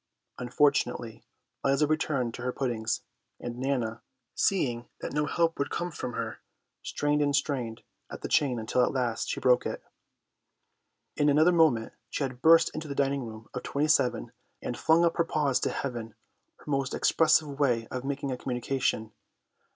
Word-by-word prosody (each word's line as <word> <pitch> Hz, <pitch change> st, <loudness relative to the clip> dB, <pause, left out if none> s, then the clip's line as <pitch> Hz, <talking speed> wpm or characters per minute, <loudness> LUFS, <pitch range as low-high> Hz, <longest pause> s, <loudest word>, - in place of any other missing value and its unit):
Unfortunately 125 Hz, -2 st, +1 dB, 0.4 s
Liza 140 Hz, +2 st, +3 dB
returned 145 Hz, -5 st, 0 dB
to -, -, -7 dB
her 125 Hz, -, -1 dB
puddings, 115 Hz, -4 st, -2 dB, 0.4 s
and 120 Hz, 0 st, -6 dB
Nana, 125 Hz, -4 st, -1 dB, 0.3 s
seeing 120 Hz, -11 st, 0 dB
that -, -, -5 dB
no 150 Hz, 0 st, +1 dB
help 165 Hz, -2 st, +1 dB
would 140 Hz, -, 0 dB
come 175 Hz, 0 st, -3 dB
from 125 Hz, -5 st, -5 dB
her, -, -, -4 dB, 0.4 s
strained 145 Hz, 0 st, 0 dB
and 145 Hz, -1 st, +2 dB
strained 125 Hz, -5 st, -2 dB, 0.3 s
at -, -, -8 dB
the -, -, -3 dB
chain 135 Hz, -5 st, +2 dB
until 115 Hz, +3 st, +1 dB
at -, -, +1 dB
last 120 Hz, -4 st, -1 dB
she -, -, -2 dB
broke 125 Hz, -1 st, +4 dB
it. -, -, -5 dB, 1.3 s
In 145 Hz, -, +3 dB
another 155 Hz, +5 st, +5 dB
moment 155 Hz, -10 st, +3 dB, 0.2 s
she -, -, -2 dB
had 130 Hz, -2 st, -4 dB
burst 165 Hz, +2 st, +6 dB
into 155 Hz, 0 st, -5 dB
the 140 Hz, -, -5 dB
dining 140 Hz, -1 st, +1 dB
room 110 Hz, 0 st, -10 dB
of 125 Hz, -, -4 dB
27 130 Hz, -6 st, +1 dB, 0.3 s
and 120 Hz, -, -4 dB
flung 160 Hz, +7 st, +4 dB
up 170 Hz, -, +1 dB
her 170 Hz, -, +4 dB
paws 150 Hz, -5 st, +1 dB
to -, -, 0 dB
heaven, 120 Hz, -5 st, -4 dB, 0.4 s
her -, -, -20 dB
most 135 Hz, -2 st, -1 dB
expressive 155 Hz, -3 st, +3 dB
way 120 Hz, -5 st, +2 dB
of 125 Hz, 0 st, -4 dB
making 140 Hz, 0 st, -3 dB
a 125 Hz, -, -2 dB
communication. 125 Hz, -3 st, -1 dB
Mr. -, -, -33 dB
135 Hz, 170 wpm, -28 LUFS, 120-150 Hz, 1.3 s, burst